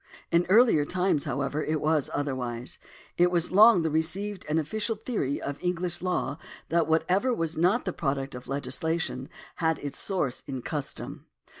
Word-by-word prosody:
In 170 +1 +3
earlier 215 -7 +6
times, 180 -1 0
however, 140 +2 -1
it 155 0 0
was 155 -2 +1
otherwise. 125 -4 -3 0.4
It 175 0 +6
was 175 -1 +1
long 210 -1 +7
the 160 - 0
received 185 +6 -1
and 155 - +2
ofificial 215 +7 -1
theory 215 - -2
of 140 0 -5
English 180 -1 -2
law 155 -6 -1 0.3
that 170 0 +2
whatever 180 +10 +2
was 165 -3 -1
not 180 +9 +2
the 185 - -2
product 135 -3 -2
of 125 0 -9
legislation 140 +1 -2 0.3
had 160 -2 +1
its 145 -1 -5
source 165 -10 -1
in 130 -3 -5
custom. 145 -3 -5
160 Hz, 160 wpm, -27 LUFS, 140-180 Hz, 0.4 s, long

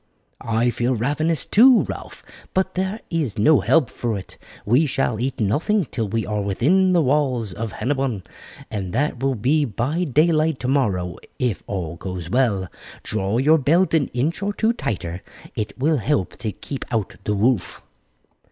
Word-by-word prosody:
"I 115 +2 +1
feel 120 +2 0
ravenous 145 +7 0
too, 245 +3 +6
Ralph, - - -8 0.3
but 190 0 +1
there 190 +4 -2
is 155 - -1
no 145 +9 +5
help 160 -6 +3
for 115 -4 -2
it. 95 - -10 0.3
We 130 +9 +3
shall 125 -5 -1
eat 130 +2 -2
nothing 155 - +1
till 115 -5 -3
we 110 +1 -1
are 105 +1 -2
within 165 - +2
the 170 -2 +4
walls 130 -7 +1
of 110 +2 -5
Hennebon, 130 -7 -1 0.5
and 95 -4 -4
that 135 0 -1
will 135 -1 +1
be 140 +8 +2
by 140 +8 -1
daylight 155 +1 +2
tomorrow 105 -10 0 0.2
if 125 -6 -1
all 85 -4 -4
goes 90 -1 -6
well. 105 -7 +1 0.4
Draw 105 +1 -1
your 155 +5 +4
belt 165 +7 +2
an 155 -4 +3
inch 150 +9 -2
or 205 +1 -1
two 220 +2 +1
tighter, 90 - -4 0.3
it 105 -2 -4
will 150 +4 +2
help 130 -5 -1
to 110 - -3
keep 135 +8 -6
out 110 -4 -2
the 105 - -1
wolf." 110 -2 0
125 Hz, 165 wpm, -22 LUFS, 105-155 Hz, 0.5 s, too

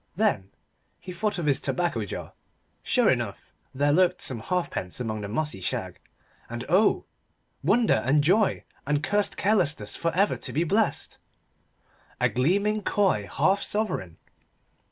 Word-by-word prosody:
Then 130 - +1 0.5
he 185 - -8
thought 205 +3 -1
of 170 - -2
his 140 -2 +2
tobacco 170 -11 -1
jar. - - -7 0.5
Sure - - +2
enough, - - -1 0.2
there 145 +2 +2
lurked 180 +2 +3
some 125 -4 -4
halfpence 170 - -3
among 110 -3 -3
the 100 - -4
mossy 120 -1 -2
shag, - - -3 0.5
and - - -5
oh, - - +3 0.6
wonder 220 - +3
and 145 +3 +3
joy 195 +6 +2 0.2
and 145 0 +1
cursed 205 +4 0
carelessness 155 - +1
for 165 - 0
ever 200 +3 +2
to - - -6
be 160 - +1
blessed 205 +6 0 1.0
a - - +3
gleaming 200 - +1
coy 185 - +1
half 190 +8 +2
sovereign. 180 - -2
170 Hz, 140 wpm, -26 LUFS, 130-200 Hz, 1.0 s, lurked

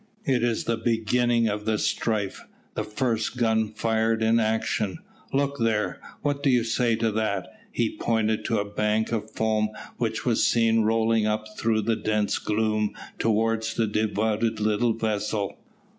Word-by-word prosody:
"It 130 -3 +2
is 120 -2 0
the 115 - 0
beginning 115 +1 +2
of 105 0 -2
the 110 -1 +1
strife 105 -2 -1 0.3
the 105 - -2
first 115 +1 -1
gun 110 -2 +2
fired 110 0 +1
in 115 +1 +4
action. 110 -3 0 0.3
Look 140 0 0
there, 110 -5 0 0.2
what 145 -1 0
do 140 - +2
you 125 -3 +4
say 115 0 +1
to 115 0 0
that?" 105 -3 -1 0.2
He - - -1
pointed 110 -1 0
to - - +1
a 100 - 0
bank 105 +2 0
of 110 -2 -2
foam 110 -1 0 0.3
which 110 -2 -2
was 120 -3 +2
seen 115 -1 +3
rolling 110 0 +2
up 110 0 -1
through 110 -1 +1
the 115 - +1
dense 105 -1 0
gloom 110 0 0 0.2
towards 110 0 +1
the 115 - +2
devoted 110 +1 0
little 110 +2 +2
vessel. 105 -2 -2
110 Hz, 160 wpm, -26 LUFS, 110-115 Hz, 0.3 s, in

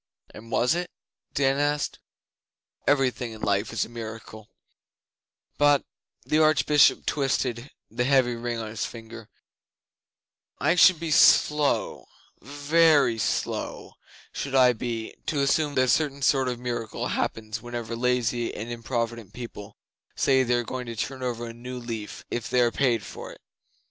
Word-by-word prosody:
'And 115 +2 -12
was 120 +3 +2
it?' 175 +1 -3 0.5
Dan 135 0 +2
asked. 145 0 -1 0.9
'Everything 130 -4 +1
in 110 - -11
life 100 +1 0
is 115 -3 -1
a - - -14
miracle, 110 -2 -9 1.1
but' 145 -1 +4 0.4
the 155 - +2
Archbishop 155 -1 +4
twisted 130 -3 -1 0.2
the 120 +2 -1
heavy 130 -2 +3
ring 120 0 -4
on 110 -1 -5
his 110 0 -4
finger 115 -1 -9 1.3
'I 155 +4 +2
should 180 -1 +6
be 165 -1 -4
slow 150 0 +3 0.3
ve 150 - +3
ry 135 -5 +2
slow 90 -5 -3 0.4
should 135 -1 -4
I 125 -2 +6
be 115 -1 -5
to 145 -2 0
assume 145 +1 +1
that 130 - +4
a - - +1
certain 140 +1 +1
sort 135 0 +3
of 125 -1 -2
miracle 120 -2 -4
happens 110 0 -3
whenever 120 -1 -5
lazy 120 -1 0
and 115 +3 -6
improvident 115 -3 -4
people 115 -4 -9 0.4
say 130 -1 +3
they 125 -1 +1
are 120 - 0
going 125 +1 -6
to 115 - -5
turn 130 +4 -4
over 120 -2 -3
a 115 - -7
new 125 +2 -8
leaf 115 -3 -7
if 120 -2 -3
they 125 - +3
are 120 -1 +3
paid 125 -4 +1
for - - -9
it. - - -15
125 Hz, 155 wpm, -26 LUFS, 115-140 Hz, 1.3 s, should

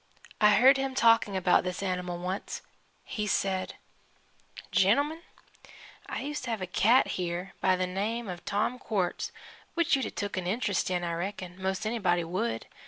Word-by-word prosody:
I 210 -1 +7
heard 265 +4 +7
him 270 -1 -2
talking 230 -5 +4
about 180 -1 +4
this 180 +1 -3
animal 180 -2 -2
once. 185 +3 -4 0.4
He 210 -1 -3
said: 190 -1 0 1.0
"Gentlemen, 275 - +3 0.9
I - - -4
used 295 +1 -4
to - - -4
have 225 -2 -1
a 185 - -3
cat 220 +7 +4
here, 175 +2 -3
by 185 - +4
the 185 0 0
name 210 +5 -2
of 180 -2 -6
Tom 220 +5 -1
Quartz, 190 -8 -2 0.4
which 340 -4 +3
you'd 270 - -1
'a' - - -4
took 205 -2 -4
an 180 -1 -2
interest 200 -2 0
in, 180 -1 -1
I 170 -1 -2
reckon, 185 +1 -5
most 190 +2 -1
anybody 195 -6 +1
would. 190 +8 -2
195 Hz, 170 wpm, -29 LUFS, 180-230 Hz, 1.0 s, I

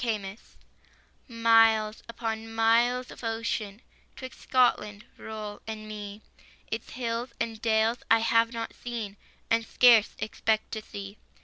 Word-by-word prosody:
TO 245 - -2
SCOTLAND. 205 -2 -2 0.9
Miles 225 -2 +4
upon 225 -1 -4
miles 240 +3 +3
of - - -12
ocean 225 -1 -3 0.3
'Twixt 260 -1 -10
Scotland 215 -4 +1
roll 215 -1 -7
and 215 -1 -6
me. 210 0 -8 0.5
Its 225 0 -4
hills 235 0 -3
and 225 -1 -3
dales 225 +1 +2
I 225 - +7
have 230 0 +2
not 230 -2 -5
seen, 230 -5 -6 0.4
And 230 0 +3
scarce 230 -2 +5
expect 220 0 -1
to 220 - -4
see. 200 -1 -9
225 Hz, 130 wpm, -28 LUFS, 215-230 Hz, 0.9 s, I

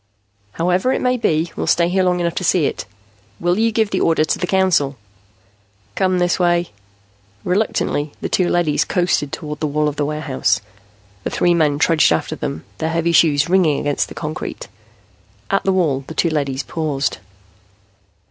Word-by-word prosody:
"However 180 +8 +1
it - - 0
may 250 0 +1
be, 165 -8 0
we'll - - -3
stay 175 +3 +2
long 180 -1 +1
enough 170 -1 -1
to - - -3
see 175 -3 +2
it. - - -3 0.5
Will 175 +3 +1
you 230 0 +2
give 220 -1 0
the 185 - 0
order 160 -1 +3
to - - -1
the 180 - -2
Council?" 175 -8 +2 1.0
"Come 185 - +1
this 175 0 +1
way." 175 -1 +1 0.7
Reluctantly, 180 -6 0
the - - -3
two 180 -2 +1
leadys 170 -4 +2
coasted 175 -6 0
toward 150 -1 -6
the 155 - -1
wall 150 +1 0
of 145 -1 -3
the 145 - 0
warehouse. 150 -3 0 0.6
The - - -2
three 175 - +2
men 155 -4 +2
trudged 160 - +3
after 80 - -1
them, 80 - -5
their 160 - -1
heavy 165 +1 0
shoes 150 -4 +4
ringing 175 -5 +3
against 145 -1 -1
the - - -11
concrete. 155 +1 -5 0.8
At 195 - +1
the 195 - +3
wall, 155 -8 +1
the 160 - -8
two 170 - +1
leadys 140 -3 -1
paused. 150 -4 -2
170 Hz, 175 wpm, -19 LUFS, 150-180 Hz, 1.0 s, shoes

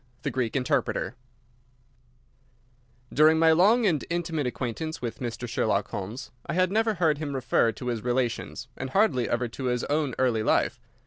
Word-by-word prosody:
X. - - -37
The - - -1
Greek 125 -2 -2
Interpreter 125 -5 0 2.0
During 155 +2 +5
my 160 0 +5
long 210 +9 +5
and 160 -8 +2
intimate 165 -4 -1
acquaintance 130 +7 -4
with 120 -2 -5
Mr. 120 -1 -4
Sherlock 105 -3 0
Holmes 115 +8 -6 0.2
I - - -2
had 185 0 +2
never 220 +1 +2
heard 160 -4 +2
him 145 -3 -3
refer 120 -3 +2
to 125 - -9
his 115 -2 -2
relations, 120 -1 -2
and 130 - -5
hardly 135 - +2
ever 120 +1 0
to 130 +3 -6
his 125 -1 0
own 145 -4 0
early 125 -4 +2
life. 110 - +1
130 Hz, 170 wpm, -27 LUFS, 120-160 Hz, 2.0 s, During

